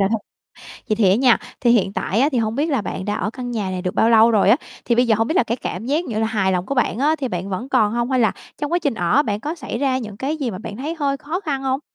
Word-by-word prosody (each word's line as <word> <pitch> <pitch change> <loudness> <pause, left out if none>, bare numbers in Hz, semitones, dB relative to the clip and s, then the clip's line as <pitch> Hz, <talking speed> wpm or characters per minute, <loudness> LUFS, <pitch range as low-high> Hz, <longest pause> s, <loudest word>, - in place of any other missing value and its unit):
rồi 195 - +3
thôi. 225 - +1 0.7
Vậy 215 - +1
thì 205 -4 +4
á - - +5
nha, 250 -1 +4 0.2
thì 240 - +3
hiện 205 -5 +3
tại 205 +2 -1
á 275 - +4
thì 250 - +1
hông 220 -1 0
biết 295 +6 0
là 275 -5 +1
bạn 190 - -5
đã 205 +1 -1
ở 205 - -2
căn 245 +1 -6
nhà 210 -5 -2
này 185 -1 -4
được 180 -1 -3
bao 225 - +3
lâu 225 0 +6
rồi 210 -2 +4
á? 230 - +6 0.3
Thì 235 - +2
bây 245 +1 +3
giờ 225 - +4
hông 225 - +2
biết 315 - -1
là - - +5
cái 235 0 -2
cảm 220 -2 -5
giác 305 +6 0
như 230 -7 -3
là 220 - +1
hài 200 -4 +1
lòng 180 0 -1
của 275 - -2
bạn 245 -3 0
á 300 +4 +2
thì 265 -3 -2
bạn 180 -1 -4
vẫn 195 +7 -4
còn 220 -6 +2
hông, 240 +2 -1
hay 255 -2 +2
là 220 - +3 0.3
trong 295 +2 -3
quá 345 - +3
trình 285 -7 -1
ở 190 +9 +2
bạn 210 -5 -2
có 300 +7 -3
xảy 255 -7 -5
ra 265 -2 +1
những 215 -5 -7
cái 280 +7 -2
gì 270 -6 -2
mà 185 - -6
bạn 205 0 -7
thấy 295 +7 -4
hơi 280 -2 0
khó 310 +6 -4
khăn 285 -7 -3
hông? 265 0 -1
235 Hz, 330 wpm, -21 LUFS, 210-275 Hz, 0.7 s, lâu